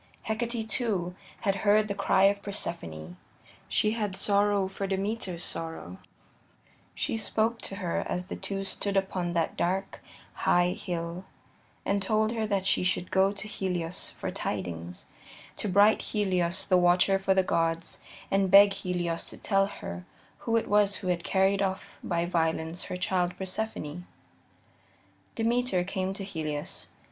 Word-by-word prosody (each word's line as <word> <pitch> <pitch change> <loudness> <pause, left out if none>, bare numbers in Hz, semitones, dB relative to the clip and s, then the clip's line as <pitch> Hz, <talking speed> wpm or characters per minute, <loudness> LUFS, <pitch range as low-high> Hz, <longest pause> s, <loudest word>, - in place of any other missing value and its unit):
Hecate, 225 0 -2
too, 195 -7 0 0.3
had 195 -2 +1
heard 215 +1 +4
the 200 - -1
cry 195 -1 +2
of 200 +1 +4
Persephone; 90 - -5 0.5
she 215 - +2
had 210 -4 -2
sorrow 200 0 +2
for 195 +1 -4
Demeter's 195 -2 -2
sorrow: 160 - -5 1.0
she - - -1
spoke 225 +1 0
to 195 - -3
her 180 -4 -1
as 180 0 -1
the - - -5
two 195 -1 -3
stood 195 +1 0
upon 185 -3 -1
that 165 -1 0
dark, 190 +3 -1 0.3
high 175 0 +3
hill, 175 0 -4 0.6
and 200 0 +1
told 215 +2 +2
her 225 -2 -1
that 200 -2 0
she - - +3
should 180 -1 0
go 190 +1 +4
to 205 +1 -6
Helios 180 -4 -2
for - - -5
tidings 85 0 -4 0.5
to 210 - -2
bright 205 +3 +5
Helios, 185 -4 0
the 185 - +4
watcher 180 +2 +4
for 195 0 +2
the 190 - +4
gods, 165 -1 0 0.3
and 195 -1 +3
beg 200 +1 +8
Helios 180 -4 -2
to - - -6
tell 195 -1 +2
her 85 - -7 0.4
who 230 -1 +1
it 225 - -1
was 205 -1 +4
who 185 - -3
had 175 -1 0
carried 195 +1 +2
off 190 0 -3
by 170 -1 0
violence 165 0 -1
her 180 - -4
child 180 -1 0
Persephone. 185 -4 -4 1.3
Demeter 230 -4 +1
came 190 0 -2
to 195 - -5
Helios. 155 -6 -4
190 Hz, 150 wpm, -28 LUFS, 175-205 Hz, 1.3 s, beg